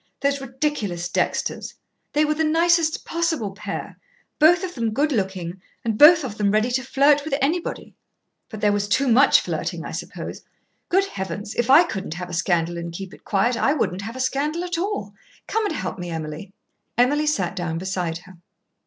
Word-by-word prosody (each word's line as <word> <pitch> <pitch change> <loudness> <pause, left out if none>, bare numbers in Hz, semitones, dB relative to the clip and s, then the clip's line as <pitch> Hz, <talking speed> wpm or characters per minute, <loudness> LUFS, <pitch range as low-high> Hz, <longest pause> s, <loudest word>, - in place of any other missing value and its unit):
Those 280 0 +1
ridiculous 255 - -2
Dexters! - - -2 0.4
They 300 +1 +3
were 305 - +1
the 315 +1 0
nicest 330 0 +2
possible 325 - -1
pair 195 - -6 0.4
both 335 +4 +6
of 365 -1 -4
them 230 -3 -2
good 295 +2 +2
looking 190 -5 -2 0.2
and 225 -2 0
both 310 +6 +8
of 220 -5 -6
them 205 -1 +2
ready 215 +4 +2
to 260 +1 0
flirt 280 +3 +3
with 295 -2 -1
anybody. 325 +6 -2 0.6
But 215 -2 -8
there 210 -1 +4
was 205 0 0
too 270 +6 +2
much 255 +4 +6
flirting, - - -4
I - - -6
suppose. - - -6 0.5
Good 385 +2 +3
heavens! 195 - -5
if 240 +1 -1
I 305 +6 +8
couldn't 195 - -5
have 180 0 -6
a - - -7
scandal 170 0 0
and 170 0 -5
keep 190 +2 -7
it - - -15
quiet, 215 +5 +1
I 275 +4 +2
wouldn't 195 -10 -1
have 225 +4 -6
a - - -7
scandal 290 +6 -1
at 355 -2 -2
all. 410 +4 -3 0.3
Come 445 -1 0
and 320 - -3
help 185 -5 -4
me, 175 0 -5
Emily." 160 +3 -6 0.5
Emily 290 +5 +3
sat 190 - 0
down 170 -2 -3
beside 180 -2 -2
her. 185 -1 -15
240 Hz, 190 wpm, -23 LUFS, 190-300 Hz, 0.6 s, both